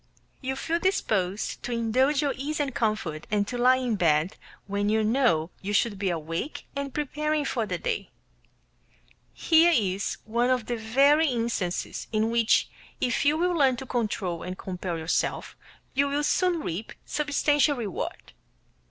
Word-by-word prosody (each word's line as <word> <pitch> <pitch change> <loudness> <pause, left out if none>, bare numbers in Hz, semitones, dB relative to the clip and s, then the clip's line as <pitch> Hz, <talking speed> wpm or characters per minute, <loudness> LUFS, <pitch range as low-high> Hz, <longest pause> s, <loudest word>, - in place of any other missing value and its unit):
You 265 0 -2
feel 325 +5 -1
disposed 210 - 0
to - - -5
indulge 255 +5 +2
your 280 - +1
ease 300 +3 -3
and 280 -3 -1
comfort, 215 -10 -2
and 205 -1 +1
to 250 - -4
lie 250 +1 +5
in 250 -4 -1
bed 160 0 +2 0.3
when 205 +1 -1
you 220 0 +2
know 215 - +2
you 200 +2 -3
should 210 -2 +1
be 195 -1 0
awake 165 - -4
and 280 0 -3
preparing 300 +1 -1
for 230 -5 -1
the - - -2
day. 480 -3 -3 1.2
Here 330 +1 +4
is 200 - 0
one 235 +3 +1
of 250 -3 +1
the 240 - -2
very 275 +8 +4
instances 230 -8 -2
in 220 0 +1
which 235 -1 +3 0.3
if 250 +2 0
you 295 +2 +4
will 355 +2 +1
learn 275 -6 +3
to 265 - -7
control 210 -8 -2
and 185 +1 -5
compel 180 -2 -4
yourself 160 +1 -1 0.4
you 280 +1 +2
will 285 +1 0
soon 350 +1 +2
reap 195 - -5
substantial 295 -1 +2
reward. 210 -6 -5
240 Hz, 160 wpm, -27 LUFS, 200-285 Hz, 1.2 s, lie